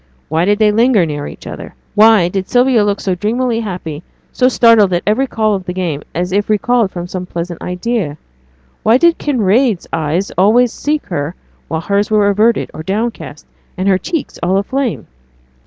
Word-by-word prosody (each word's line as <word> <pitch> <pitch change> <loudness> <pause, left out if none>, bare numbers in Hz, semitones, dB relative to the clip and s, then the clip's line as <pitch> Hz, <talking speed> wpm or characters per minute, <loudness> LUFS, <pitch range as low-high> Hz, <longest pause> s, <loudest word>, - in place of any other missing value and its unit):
Why 160 +3 +1
did 205 +1 +2
they 215 -1 +3
linger 225 -3 +3
near 145 -2 -4
each - - -11
other? - - -8 0.2
Why 215 -4 +5
did 190 +1 -3
Sylvia 245 -3 +3
look 205 -1 0
so 190 - -1
dreamily 225 +5 -1
happy, 180 -8 -5 0.3
so 255 - +2
startled 230 -6 +4
at 175 - 0
every 235 +6 +1
call 215 -3 0
of 190 -2 -3
the 180 - -4
game, 170 -6 -2
as 180 +1 -2
if 205 +2 0
recalled 220 +1 +2
from 175 -2 -6
some 180 0 -6
pleasant 170 0 -5
idea? 180 -4 -3 0.6
Why 225 +3 +4
did 340 +4 +3
Kinraid's 235 - +1
eyes 160 +4 -1
always 230 +5 +4
seek 300 0 -2
her 160 0 -4 0.3
while 160 0 -3
hers 200 +4 0
were 210 -2 +3
averted, 215 +4 +1
or - - -7
downcast, 200 -4 -4 0.3
and 185 +2 -1
her 190 -1 +3
cheeks 325 - -4
all 180 +3 +1
aflame? 250 +4 -2
205 Hz, 180 wpm, -15 LUFS, 180-230 Hz, 0.6 s, Why